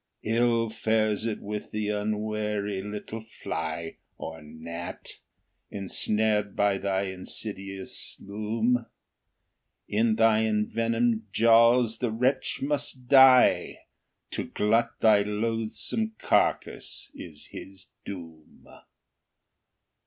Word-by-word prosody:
Ill 115 Hz, +1 st, +2 dB
fares 110 Hz, -1 st, 0 dB
it 110 Hz, -, -3 dB
with 105 Hz, +1 st, -5 dB
the 105 Hz, -1 st, -2 dB
unwary 105 Hz, -1 st, -2 dB
little 105 Hz, +2 st, -6 dB, 0.2 s
fly, 80 Hz, 0 st, -4 dB, 0.2 s
Or 80 Hz, 0 st, -7 dB
gnat, 80 Hz, +3 st, -8 dB, 0.5 s
ensnared 105 Hz, +1 st, 0 dB
by 100 Hz, -1 st, +2 dB
thy 95 Hz, 0 st, 0 dB
insidious 95 Hz, 0 st, -5 dB
loom; 110 Hz, +4 st, -1 dB, 1.0 s
In 110 Hz, +1 st, +2 dB
thy 110 Hz, -1 st, +4 dB
envenomed 115 Hz, +1 st, 0 dB
jaws 115 Hz, +1 st, +5 dB
the 120 Hz, -, 0 dB
wretch 130 Hz, +5 st, 0 dB
must 140 Hz, -3 st, -2 dB
die; 130 Hz, -2 st, +6 dB, 0.5 s
To -, -, -3 dB
glut 115 Hz, +3 st, +1 dB
thy 105 Hz, -2 st, +6 dB
loathsome 115 Hz, -, -2 dB
carcass -, -, 0 dB
is 75 Hz, -3 st, -10 dB
his 95 Hz, -1 st, -10 dB, 0.2 s
doom! 80 Hz, -5 st, -10 dB
110 Hz, 95 wpm, -27 LUFS, 100-115 Hz, 1.0 s, die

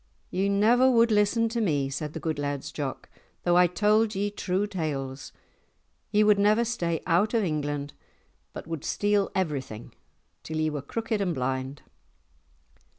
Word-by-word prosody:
"Ye 190 Hz, +2 st, 0 dB
never 230 Hz, +6 st, +4 dB
would 230 Hz, -2 st, +4 dB
listen 210 Hz, +2 st, +3 dB
to 230 Hz, +1 st, -2 dB
me," 145 Hz, -9 st, +1 dB
said 150 Hz, +2 st, -4 dB
the -, -, -5 dB
good 160 Hz, -3 st, -3 dB
Laird's 145 Hz, -1 st, -3 dB
Jock, 140 Hz, -3 st, -5 dB, 0.4 s
"though 175 Hz, 0 st, +3 dB
I 180 Hz, 0 st, +6 dB
told 210 Hz, +4 st, +2 dB
ye 205 Hz, +1 st, -1 dB
true 195 Hz, 0 st, -1 dB
tales. 145 Hz, -9 st, -4 dB, 0.8 s
Ye 210 Hz, +1 st, +3 dB
would 210 Hz, -1 st, +4 dB
never 215 Hz, +3 st, +3 dB
stay 170 Hz, -9 st, -2 dB
out 190 Hz, +7 st, +2 dB
of 225 Hz, -, +2 dB
England 145 Hz, -4 st, -2 dB, 0.6 s
but -, -, -8 dB
would 165 Hz, -2 st, -5 dB
steal 205 Hz, -1 st, +1 dB
everything, 140 Hz, -, -3 dB, 0.5 s
till 160 Hz, -, -5 dB
ye 155 Hz, 0 st, 0 dB
were 145 Hz, -2 st, -4 dB
crooked 220 Hz, +7 st, -3 dB
and 180 Hz, -4 st, 0 dB
blind." 130 Hz, +2 st, -3 dB
180 Hz, 155 wpm, -27 LUFS, 145-210 Hz, 0.8 s, I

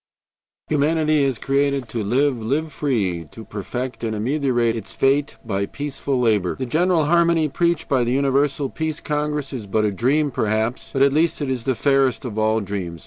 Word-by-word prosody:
"Humanity 155 Hz, 0 st, +2 dB
is 135 Hz, -4 st, 0 dB
created 140 Hz, -1 st, 0 dB
to 110 Hz, 0 st, -3 dB
live, 130 Hz, +5 st, +1 dB
to -, -, -7 dB
live 145 Hz, +6 st, -1 dB
free, 95 Hz, -, -1 dB
to 110 Hz, -, -11 dB
perfect 125 Hz, +5 st, -5 dB
and 110 Hz, -1 st, -1 dB
ameliorate 120 Hz, 0 st, +1 dB
its 115 Hz, -, -7 dB
fate 140 Hz, +2 st, +1 dB
by 100 Hz, +1 st, -1 dB
peaceful 140 Hz, -2 st, -3 dB
labor. 105 Hz, -7 st, +1 dB
The 130 Hz, -, -4 dB
general 165 Hz, +4 st, +2 dB
harmony 170 Hz, 0 st, +3 dB
preached 170 Hz, +2 st, 0 dB
by 130 Hz, -4 st, +2 dB
the 120 Hz, -, -1 dB
Universal 140 Hz, +1 st, +1 dB
Peace 160 Hz, -1 st, -3 dB
Congress 150 Hz, -2 st, -2 dB
is 115 Hz, -6 st, -5 dB
but 110 Hz, +2 st, +1 dB
a 105 Hz, -, +1 dB
dream 140 Hz, +9 st, +1 dB
perhaps, 110 Hz, +2 st, -1 dB
but 135 Hz, -, +2 dB
at 140 Hz, 0 st, +4 dB
least 160 Hz, +3 st, +2 dB
it 140 Hz, -3 st, -2 dB
is 125 Hz, -3 st, -3 dB
the 130 Hz, -, +1 dB
fairest 135 Hz, -2 st, +2 dB
of 110 Hz, -3 st, -4 dB
all 110 Hz, +1 st, +2 dB
dreams. 95 Hz, -4 st, -5 dB
135 Hz, 190 wpm, -22 LUFS, 110-150 Hz, -, at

